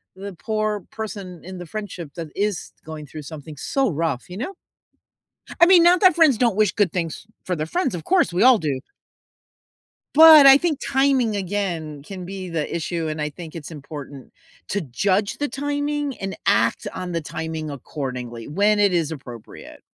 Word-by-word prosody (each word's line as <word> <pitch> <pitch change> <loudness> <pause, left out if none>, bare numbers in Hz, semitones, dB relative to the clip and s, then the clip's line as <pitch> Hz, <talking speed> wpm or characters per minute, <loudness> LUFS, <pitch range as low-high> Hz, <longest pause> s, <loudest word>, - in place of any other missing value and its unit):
the 195 +1 -8
poor 215 +2 -2
person 200 -5 -7
in 185 +1 -8
the 175 - -7
friendship 180 -5 -7
that 165 -2 -5
is 205 -3 -2
going 155 -1 -8
through 155 +2 -9
something 150 0 -9
so 270 - 0
rough, 160 -6 -2
you 180 - -8
know? 265 - -4 1.1
I 340 - +9
mean, 360 -1 +7
not 350 +1 +5
that 370 -2 +7
friends 310 -9 +5
don't 235 -4 +2
wish 215 -2 +3
good 205 -5 +1
things 170 +2 -4 0.2
for 180 - -2
their 155 0 -3
friends, 350 - -1
of 160 - -8
course 365 - +2
we 180 +3 +1
all 255 -2 +7
do. 145 -7 -2 1.3
But 315 -1 +10
I 270 0 +10
think 310 -2 -1
timing, 265 -5 +2
again, 175 -7 -3
can 185 +3 -8
be 190 0 -6
the 160 -3 -3
issue, 165 0 -2
and 155 0 -4
I 150 - -1
think 160 +1 -10
it's 160 -1 -8
important 145 -3 -9 0.4
to 205 - 0
judge 190 - 0
the 290 -2 -1
timing 290 0 -2
and 195 0 -5
act - - +2
on 180 -1 -5
the 170 - -1
timing 160 +1 -5
accordingly, 125 -4 -6
when 205 +7 +2
it 200 -2 +3
is 165 -3 0
appropriate. 125 -7 -10
185 Hz, 180 wpm, -22 LUFS, 155-225 Hz, 1.3 s, But